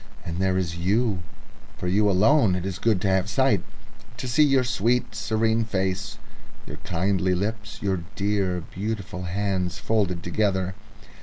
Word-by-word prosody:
And 85 +1 -4
there 95 -1 +2
is 85 -3 -2
you. 100 +3 +1 0.6
For 90 - -4
you 105 +3 +3
alone 105 +2 +4
it 90 0 -3
is 95 -1 -4
good 110 -4 +2
to 100 - 0
have 95 +1 +2
sight, 110 -3 +3 0.6
to 130 - -4
see 125 +5 +2
your 135 -3 +5
sweet, 120 0 +1
serene 110 +1 +1
face, 100 -1 -2 0.5
your - - -8
kindly 95 +1 0
lips, 110 +2 -3
your 95 -3 0
dear, 100 -3 0
beautiful 100 -2 -4
hands 95 -1 -1
folded 95 -6 0
together... 95 0 0
100 Hz, 150 wpm, -25 LUFS, 90-110 Hz, 0.6 s, your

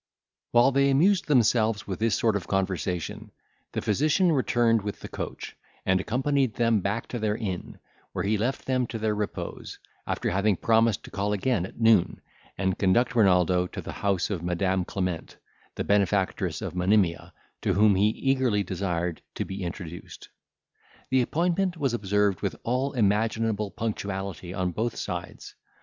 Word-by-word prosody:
While 120 +3 +5
they 140 +1 +3
amused 170 +7 +3
themselves 115 -5 +3
with 95 0 -5
this 115 -2 +2
sort 110 -3 +2
of 100 - -3
conversation, 90 -3 -2 0.4
the - - -2
physician 155 - +2
returned 120 -5 +2
with 100 0 -5
the - - -6
coach, - - -6 0.3
and 95 0 +2
accompanied 130 +1 0
them 115 -2 +2
back 100 +4 -2
to 120 - -4
their 105 -1 0
inn, 95 -6 -5 0.3
where - - -3
he 105 +2 +2
left 120 +6 -2
them 130 -2 0
to 115 - -5
their 110 -1 0
repose, 105 -1 -5 0.3
after - - -1
having 100 +3 +2
promised 115 0 +2
to - - -11
call 100 +1 -1
again 105 -3 0
at - - -16
noon, 110 -5 +4 0.4
and 95 -1 -1
conduct 120 +6 +2
Renaldo 90 -4 +4
to - - -8
the - - -6
house 100 0 -1
of 90 -5 -2
Madam 90 +1 0
Clement, 90 -4 -4 0.4
the - - -2
benefactress 100 -1 +1
of - - -4
Monimia, 90 -1 +1 0.3
to - - +1
whom 105 +1 +5
he 100 +2 +3
eagerly 125 -3 +1
desired 90 -2 -2
to - - -2
be 95 +1 -6
introduced. 85 -1 -7 0.8
The 130 -1 +4
appointment 175 +6 0
was 135 -5 0
observed 105 -3 +1
with - - -2
all 130 +4 0
imaginable 110 -1 +1
punctuality 100 -5 -4
on 90 -1 -1
both 115 +6 -2
sides. - - -6
105 Hz, 160 wpm, -26 LUFS, 95-120 Hz, 0.8 s, While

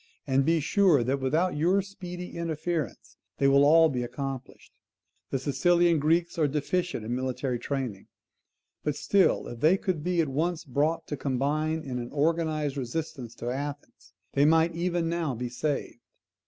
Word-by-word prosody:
And 135 0 +2
be 165 +3 +2
sure 165 - +3
that 135 +3 0
without 155 +7 +1
your 180 +6 +2
speedy 180 -2 -8
interference 165 -1 -3 0.2
they 140 - +3
will 140 +1 +5
all 160 +3 +6
be 130 -5 -2
accomplished. 135 +1 -6 0.6
The - - 0
Sicilian 170 +4 +3
Greeks 165 +4 +1
are 155 - +4
deficient 150 -2 -2
in 115 - -2
military 130 -1 -2
training; 125 -7 -4 0.8
but 150 -2 -1
still 195 +4 +2
if 120 - -8
they 160 +8 +4
could 180 -6 -2
be 180 0 0
at 160 - +3
once 160 +5 -1
brought 155 +4 0
to 145 - -4
combine 145 +4 -1
in 125 -2 -4
an 120 0 -6
organised 155 -1 0
resistance 135 -2 -4
to 120 +1 -4
Athens, 140 -8 -7 0.2
they 140 - +3
might 160 +2 +4
even 170 0 -1
now 165 -5 -1
be 125 +1 -4
saved. 135 0 -3
150 Hz, 160 wpm, -28 LUFS, 135-170 Hz, 0.8 s, all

